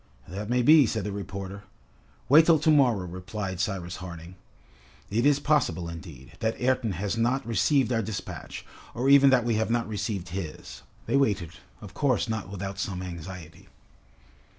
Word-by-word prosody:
"That 100 +5 -6
may 125 0 +2
be," 150 -1 +7
said 110 -1 -2
the 105 - -3
reporter. 100 0 -6 0.7
"Wait 155 +5 +7
till 165 -2 +6
to 155 +1 +2
morrow," 125 -10 +3
replied 95 +1 -5
Cyrus 90 -2 -3
Harding. 85 -1 -9 0.8
"It 115 +6 +2
is 145 -1 +4
possible, 145 - +1
indeed, 80 -6 -10
that 110 0 -1
Ayrton 125 -4 +1
has 100 +5 -3
not 120 +4 +1
received 125 +2 +2
our 115 - +1
despatch, 110 -1 -6 0.3
or 125 +3 0
even 140 0 +7
that 125 -3 +3
we 115 -2 +1
have 110 0 0
not 115 0 0
received 100 -3 -4
his." 90 -3 -7 0.2
They 140 - +1
waited, 100 - +1 0.3
of 100 -2 -10
course 130 -3 +1
not 110 -5 -3
without 100 0 -6
some 95 -2 -3
anxiety. 85 -2 -9
105 Hz, 165 wpm, -27 LUFS, 95-125 Hz, 0.8 s, be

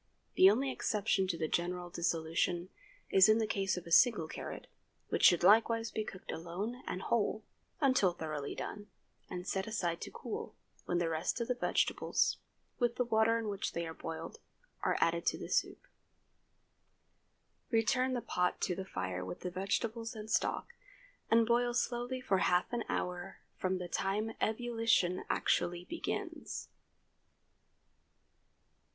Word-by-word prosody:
The 190 - +8
only 260 +6 +1
exception 205 -5 0
to 175 -3 -1
the 160 - -1
general 175 +1 -2
dissolution, 170 +1 0 0.4
is 190 +1 +7
in 215 - +6
the 225 - +1
case 195 -3 0
of 180 - -6
a 170 - -10
single 210 -4 +5
carrot, - - -7 0.4
which - - -1
should 175 - +7
likewise 225 +3 +5
be 215 - -2
cooked 190 -3 -8
alone 195 +9 -4
and 185 - -3
whole, 220 -1 0 0.4
until 260 -10 +4
thoroughly 155 -4 -4
done, 205 0 -6 0.4
and 180 0 -6
set 190 +1 -1
aside 175 -6 -1
to - - -5
cool, 455 -1 -6 0.3
when 175 - +1
the 175 -1 +1
rest 165 +7 -1
of 235 - -2
the 250 - +2
vegetables, 245 - +1 0.4
with 240 -2 +1
the 250 - +1
water 225 0 +3
in 225 -1 -3
which 200 -1 -3
they 170 - -2
were 160 - -6
boiled, 165 - -7 0.4
are - - +1
added 170 0 +2
to - - +2
the - - -6
soup. - - 0 1.8
Return 255 +3 +2
the 245 - -1
pot 180 -4 0
to 180 - +1
the 190 +2 -5
fire 95 - -3
with 90 -1 -7
the 180 - -4
vegetables 225 +5 -2
and 215 0 -7
stock, 475 - 0 0.6
and 230 0 +5
boil 240 +1 +2
slowly 245 +1 -1
for 195 -6 +1
half 180 +6 +2
an 235 -1 0
hour 180 +1 -3 0.2
from 185 0 -1
the 180 -1 -5
time 205 +5 -1
ebullition 225 -5 +1
actually 175 0 +1
begins. 335 - -4
195 Hz, 155 wpm, -33 LUFS, 175-230 Hz, 1.8 s, The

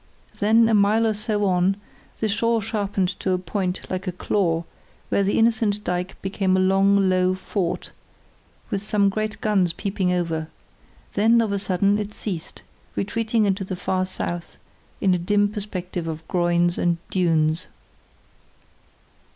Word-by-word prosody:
Then, 225 +2 +5
a 225 - +2
mile 210 +2 +4
or 220 - +2
so 210 0 -1
on, 185 +1 +2 0.4
the 220 - +2
shore 230 +2 +1
sharpened 200 -3 -1
to 190 - 0
a - - +2
point 185 +1 -2
like 185 +1 -4
a - - 0
claw, 175 -2 0 0.5
where - - +2
the 200 +1 +1
innocent 220 -2 +2
dyke 180 +1 -3
became 190 -1 +1
a - - +2
long, 195 +1 +4
low 185 0 +2
fort, 185 -1 -3 0.8
with 200 -2 -1
some 205 -1 +2
great 215 +2 -3
guns 190 -6 +2
peeping 195 -2 -1
over; 165 -3 -1 0.7
then 225 +3 +4
of 225 -3 +1
a 200 - 0
sudden 200 +2 +1
it 210 0 -5
ceased, 180 -7 -5 0.3
retreating 225 +1 0
into 195 0 0
the 185 0 -4
far 185 0 -1
south 175 -2 -5 0.4
in 190 -2 +4
a 180 - +1
dim 205 +4 +2
perspective 185 -5 -5
of 160 0 -6
groins 175 -1 +1
and 170 -1 +2
dunes. 165 -2 +1
195 Hz, 150 wpm, -23 LUFS, 180-210 Hz, 0.8 s, Then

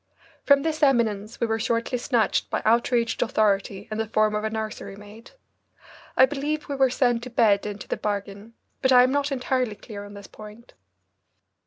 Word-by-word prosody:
From 280 -1 +4
this 315 -1 -2
eminence 230 -6 +1
we - - +1
were 225 0 -1
shortly 230 +2 -1
snatched 235 -2 0
by - - -2
outraged 235 +1 +1
authority 205 -3 0
in 215 - -3
the 225 - -1
form 215 0 +1
of 210 0 -2
a 220 - -1
nursery 215 -2 -5
maid. 210 +3 -14 0.9
I 260 - +8
believe 295 +2 -3
we 280 - -3
were 265 -1 +3
sent 245 -2 +1
to 250 - -8
bed 210 -4 +2
into 205 0 -7
the - - -2
bargain, 205 +2 -5 0.3
but 260 -1 +2
I 250 -1 +8
am 255 - +2
not 285 +1 0
entirely 255 -4 -1
clear 205 -1 -9
on 205 0 -11
this 200 0 -10
point. 215 +4 -13
225 Hz, 185 wpm, -24 LUFS, 210-255 Hz, 0.9 s, I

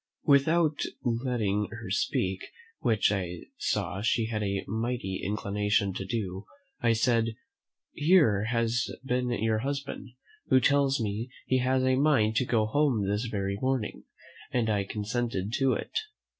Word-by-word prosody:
Without 155 +2 +4 0.3
letting 115 -4 0
her - - -8
speak, 95 0 0 0.3
which 110 -3 +2
I 90 -3 -3 0.2
saw 100 - -1
she 115 +1 +1
had 110 -1 -2
a 100 -1 -1
mighty 110 -3 -2
inclination 105 0 0
to 95 - -4
do, 95 -2 -4 0.3
I 115 -1 +3
said, 115 -1 +1 0.6
"Here 150 - +4
has 115 +2 0 0.2
been 125 -1 0
your 110 -2 +1
husband, 140 +1 -4 0.4
who 130 - +5
tells 140 +1 +3
me 110 +2 -2 0.2
he 130 - +2
has 130 +1 +2
a 130 0 +3
mind 130 -7 +3
to 125 - +2
go 115 -3 +2
home 120 -4 +1
this 105 +4 0
very 100 -3 -2
morning, 130 -4 -1 0.5
and 115 -3 +1
I 105 - +2
have 100 - -4
consented 110 -1 -2
to 135 -2 +3
it." - - -4
115 Hz, 145 wpm, -28 LUFS, 105-130 Hz, 0.6 s, who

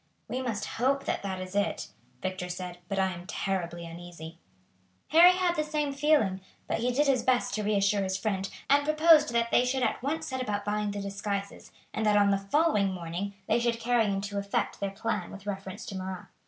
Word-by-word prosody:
"We 255 - -3
must 225 -5 -2
hope 275 +3 0
that - - -1
that 190 -2 -4
is 185 +1 -7
it," 205 0 0 0.3
Victor 185 -1 -3
said, 180 0 -6
"but 195 - -2
I 190 -1 +2
am 175 0 -9
terribly 175 -4 -3
uneasy." 170 -1 -9 0.7
Harry 345 +3 +8
had 360 -1 +1
the 305 - +1
same 300 -2 -1
feeling, 275 -10 +2 0.3
but - - -1
he 245 +2 +1
did 285 +4 +2
his 270 -4 +3
best 250 0 +1
to 215 - -1
reassure 200 -1 +2
his 190 0 -1
friend, 195 -2 -2 0.2
and 285 +1 +4
proposed 310 -1 +5
that 235 0 +1
they 245 - +5
should 255 +1 0
at - - 0
once 290 +5 -2
set 260 -1 -3
about 205 -4 -2
buying 210 0 0
the 205 0 -4
disguises, 200 0 -4 0.2
and 220 - -2
that 210 0 +5
on 200 -1 +5
the 195 - +2
following 205 -2 +2
morning 180 +3 -4
they - - +2
should 235 -1 0
carry 235 -1 +2
into 200 0 -2
effect 200 +2 -2
their 200 - -1
plan 210 -2 -3
with 200 0 -10
reference 195 0 -5
to 195 - -6
Marat. 185 -1 -5
205 Hz, 210 wpm, -29 LUFS, 190-250 Hz, 0.7 s, Harry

